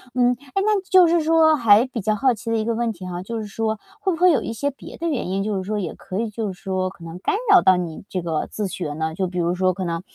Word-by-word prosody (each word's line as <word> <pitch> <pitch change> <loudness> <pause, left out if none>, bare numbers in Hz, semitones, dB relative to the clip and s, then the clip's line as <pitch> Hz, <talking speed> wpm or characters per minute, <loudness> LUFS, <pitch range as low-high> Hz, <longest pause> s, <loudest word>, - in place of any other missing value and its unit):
嗯， 245 -1 +4 0.2
诶， 390 - +2
那 420 -2 +2
就 370 -2 +7
是 335 0 +3
说 315 0 +5
还 225 -3 +5
比 250 -3 -5
较 215 +2 +1
好 260 +4 +2
奇 230 +1 -7
的 230 - +2
一 220 - 0
个 230 +1 -1
问 235 0 0
题 185 -3 -9
哈， 180 -1 -5
就 230 +3 -4
是 215 - -6
说 220 +1 -2 0.2
会 380 - 0
不 325 - -4
会 360 -1 +7
有 295 - +2
一 - - -4
些 285 +5 -1
别 275 - -12
的 335 - -3
原 280 - -2
因， 195 +2 -1
就 210 -1 -1
是 190 - -3
说 210 +3 -3
也 190 - -4
可 185 - -6
以 230 0 -1
就 210 -2 -4
是 185 - -19
说 185 -1 -1
可 175 - -15
能 165 +1 -8
干 395 - 0 0.2
扰 380 -3 +8
到 185 - +5
你 170 -2 -5
这 185 - -2
个 165 -2 -2
自 210 -2 -3
学 165 -4 -4
呢？ 160 +1 -3
就 190 +1 -1
比 180 0 -7
如 175 +1 0
说 185 0 +2
可 185 - -5
能 165 -1 -2
210 Hz, 330 characters per minute, -22 LUFS, 185-250 Hz, 0.2 s, 扰